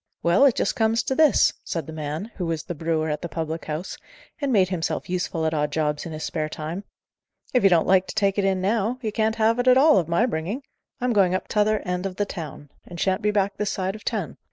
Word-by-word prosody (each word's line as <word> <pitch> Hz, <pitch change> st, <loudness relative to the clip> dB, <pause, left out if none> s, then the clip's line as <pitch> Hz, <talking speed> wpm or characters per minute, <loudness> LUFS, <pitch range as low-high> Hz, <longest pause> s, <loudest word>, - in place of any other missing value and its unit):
"Well, 175 Hz, +11 st, +5 dB
it 265 Hz, -, +4 dB
just -, -, 0 dB
comes 225 Hz, -2 st, +2 dB
to 265 Hz, -, -1 dB
this," 305 Hz, +1 st, +4 dB
said 165 Hz, -4 st, -3 dB
the 160 Hz, -, -8 dB
man, 155 Hz, +7 st, -5 dB
who 180 Hz, -4 st, -2 dB
was 165 Hz, -2 st, -2 dB
the -, -, -5 dB
brewer 160 Hz, 0 st, -1 dB
at 150 Hz, -1 st, -2 dB
the 170 Hz, -, -5 dB
public 160 Hz, 0 st, -4 dB
house, 155 Hz, +4 st, -5 dB, 0.4 s
and 280 Hz, -2 st, 0 dB
made 190 Hz, -5 st, +4 dB
himself 175 Hz, -1 st, -3 dB
useful 175 Hz, -3 st, -1 dB
at 160 Hz, -, 0 dB
odd 150 Hz, -1 st, 0 dB
jobs 150 Hz, 0 st, -1 dB
in -, -, -7 dB
his 155 Hz, 0 st, -6 dB
spare 155 Hz, -2 st, -2 dB
time: 160 Hz, +6 st, -5 dB, 0.7 s
"if 250 Hz, -, +4 dB
you 195 Hz, -, +7 dB
don't 170 Hz, -3 st, +4 dB
like 190 Hz, 0 st, +3 dB
to -, -, -7 dB
take 200 Hz, -2 st, +1 dB
it -, -, +1 dB
in 190 Hz, -1 st, +1 dB
now, 220 Hz, +4 st, 0 dB
you 215 Hz, -, -1 dB
can't 220 Hz, +1 st, 0 dB
have 225 Hz, +1 st, +2 dB
it 245 Hz, -, 0 dB
at 255 Hz, 0 st, +7 dB
all, 300 Hz, +2 st, +6 dB
of 165 Hz, -, -2 dB
my 170 Hz, +8 st, +2 dB
bringing. 200 Hz, -, -3 dB, 0.4 s
I'm 250 Hz, -1 st, 0 dB
going 190 Hz, -3 st, +3 dB
up -, -, -3 dB
to -, -, -5 dB
t'other 215 Hz, 0 st, +2 dB
end 180 Hz, 0 st, -2 dB
of 185 Hz, -, -8 dB
the 205 Hz, -, 0 dB
town, 155 Hz, -7 st, -8 dB
and 175 Hz, -1 st, -10 dB
shan't 190 Hz, -1 st, +1 dB
be 210 Hz, -, +1 dB
back 200 Hz, -1 st, 0 dB
this 210 Hz, -1 st, -1 dB
side 190 Hz, 0 st, -2 dB
of 215 Hz, -, -11 dB
ten." -, -, -3 dB
185 Hz, 260 wpm, -24 LUFS, 160-215 Hz, 0.7 s, you